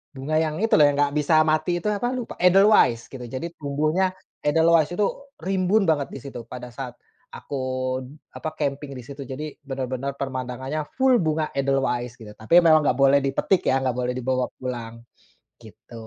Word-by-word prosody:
bunga 155 +4 0
yang 155 -1 -1
itu 225 +5 0
loh, 150 - +7
yang 145 - -2
nggak 145 0 +2
bisa 155 +1 +4
mati 155 +3 +1
itu 175 - -8
apa 210 +3 0
lupa, 250 -2 -4
edelweiss 180 - +5
gitu, 130 - -7
jadi 130 +6 -5
tumbuhnya 155 +5 0 0.3
edelweiss 160 +1 +3
itu 210 - +3 0.3
rimbun 190 +3 +1
banget 150 -5 +1
di - - -8
situ 135 -2 -8
pada 125 -1 -8
saat 125 -2 -7 0.3
aku, 140 - -7 0.8
apa 155 - -4
camping 140 -1 -3
di 125 - -8
situ 140 +2 -9
jadi 140 +3 -6
bener-bener 135 0 -4
pemandangannya 130 +2 -4 0.2
full 260 -3 +4
bunga 155 -1 -1
edelweiss 135 -3 -1
gitu, 105 -3 -11
tapi 110 +11 +2
memang 160 -3 +6
nggak 125 - 0
boleh 140 +1 +5
dipetik 140 +7 +1
ya, 130 - +3
nggak 130 - +1
boleh 125 0 -2
dibawa 130 0 -1
pulang, 120 -3 -6 0.6
gitu. - - -17
140 Hz, 170 wpm, -24 LUFS, 130-160 Hz, 0.8 s, loh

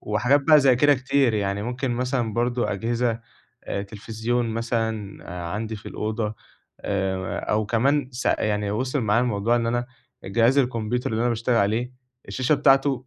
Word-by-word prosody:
وحاجات 125 +7 +2
بقى 155 +1 +6
زي 130 -3 +4
كده 145 +3 +5
كتير، 130 -2 +1
يعني 100 0 -1
ممكن 125 +2 -3
مثلًا 125 -2 -1
برضه 120 -2 0
أجهزة 115 +3 -1 0.4
آآ 100 - -3
تلفزيون 110 +3 -3
مثلًا 110 -3 -3 0.3
عندي 110 +2 -4
في 105 - -13
الأوضة 110 0 -3 0.5
آآ 95 -1 -2
أو 105 0 -1
كمان 130 +5 +1
س 120 - -5
يعني 105 -1 0
وصل 130 +6 -1
معايا 110 0 +2
الموضوع 115 0 +1
إن 115 - 0
أنا 120 +1 -1 0.4
جهاز 115 +7 +3
الكمبيوتر 120 -2 0
اللي 110 0 -1
أنا 120 - +2
باشتغل 115 +1 0
عليه 115 +4 +1 0.4
الشاشة 130 +3 +1
بتاعته 135 -2 +3
115 Hz, 155 wpm, -24 LUFS, 105-125 Hz, 0.5 s, بقى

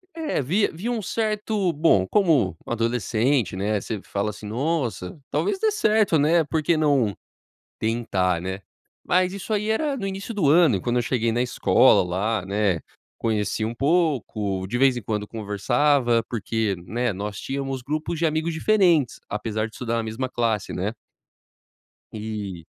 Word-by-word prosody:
É, 315 - -1
via 185 +11 +1
via 205 +9 -3
um 230 -3 -1
certo, 210 -2 -1
bom, 145 - +3
como 145 - +2
adolescente, 115 0 0
né, 105 +2 0
você 105 0 -5
fala 100 +1 -2
assim: 105 0 -10
"Nossa, 130 - -2
talvez 400 -2 0
dê 440 -1 +2
certo, 215 - +3
né. 160 +3 +4
Por 155 +1 -2
que 170 - +3
não 140 -9 +2 0.6
tentar, 100 -6 0
né?", 95 +2 -4 0.4
mas 185 0 +2
isso 200 +2 -4
aí 210 +1 0
era 280 +6 0
no 205 - -4
início 195 +4 -5
do 185 -10 +2
ano 160 - +5
e - - -7
quando 120 0 0
eu 120 - +3
cheguei 115 -2 0
na 120 - +1
escola 125 - +4
lá, 95 +3 -1
né, 100 -3 0 0.4
conheci 110 -1 -1
um 110 +2 -2
pouco, 120 - 0
de 120 - -2
vez 130 -1 +4
em 120 - -4
quando 105 0 -3
conversava 115 +4 +1
porque, 110 -2 -1
né, 120 +3 -1
nós 100 +1 -5
tínhamos 135 -1 -3
grupos 155 +4 -3
de 170 - +2
amigos 160 +1 0
diferentes, 170 - +3
apesar 110 +1 -2
de 110 - -17
estudar 115 -2 -3
na 115 - 0
mesma 110 +4 -3
classe, 115 -5 -1
né? 100 +5 -2 1.2
E 105 -5 -6
120 Hz, 165 wpm, -24 LUFS, 105-165 Hz, 1.2 s, ano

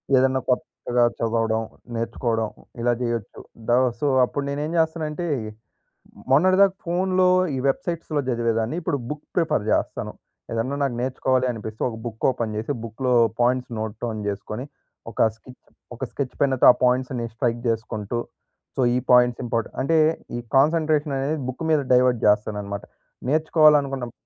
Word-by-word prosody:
ఏద్దన్నా 130 0 +3
కొత్తగా 125 -1 0
చదవడం 115 -1 0 0.3
నేర్చుకోవడం 115 -1 -1 0.3
ఇలా 120 +1 +2
చేయొచ్చు. 115 -4 -3 0.3
ద - - +1 0.3
సో 145 - 0 0.2
అప్పుడు 140 +3 -4
నేనేం 145 +2 -3
జేస్తానంటే 160 +1 -1 1.0
మొన్నటి 185 +7 +5
దాకా 195 -1 +5
ఫోనులో 185 +1 +2 0.3
ఈ - - -2
వెబ్‌సైట్స్‌లో 160 +1 -1
చదివేదాన్ని 115 +1 0
ఇప్పుడు 165 -4 -1
బుక్ 150 0 -6
ప్రిఫర్ 155 -10 +1
జేస్తాను. - - -1 0.4
ఏదన్నా 115 +5 -1
నాకు 135 -4 -1
నేర్చుకోవాలి 130 0 +1
అనిపిస్తే 110 -1 -7
ఒక 110 - -7
బుక్ 110 -2 -7
ఓపెన్ 115 -4 -3
చేసి 110 - -3
బుక్‌లో 125 +3 -1 0.3
పాయింట్స్ 125 +1 +1
నోట్ 110 0 -4
డౌన్ 115 -2 -2
చేసుకొని 105 +5 -5 0.5
ఒక - - -2
స్కెచ్ 125 +3 -16 0.4
ఒక 120 - -7
స్కెచ్ 135 -3 -4
పెన్నతో 135 -3 +4
ఆ - - 0
పాయింట్స్‌ని 125 -1 0
స్ట్రైక్ 120 -1 0
జేసుకుంటూ 110 0 -2 0.6
సో - - +2
ఈ - - +3
పాయింట్స్ 125 -1 +5
ఇంపార్ట్ 115 -2 -1
అంటే 160 +5 +2 0.4
ఈ - - -3 0.2
కాన్సంట్రేషననేది 150 -1 +2
బుక్ 130 - -6
మీద 155 -2 +4
డైవర్ట్ 125 -1 +4
జేస్తాననమాట. 105 -1 0 0.5
నేర్చుకోవాలనుకున్నపు 150 -5 +3
125 Hz, 135 wpm, -23 LUFS, 115-150 Hz, 1.0 s, మొన్నటి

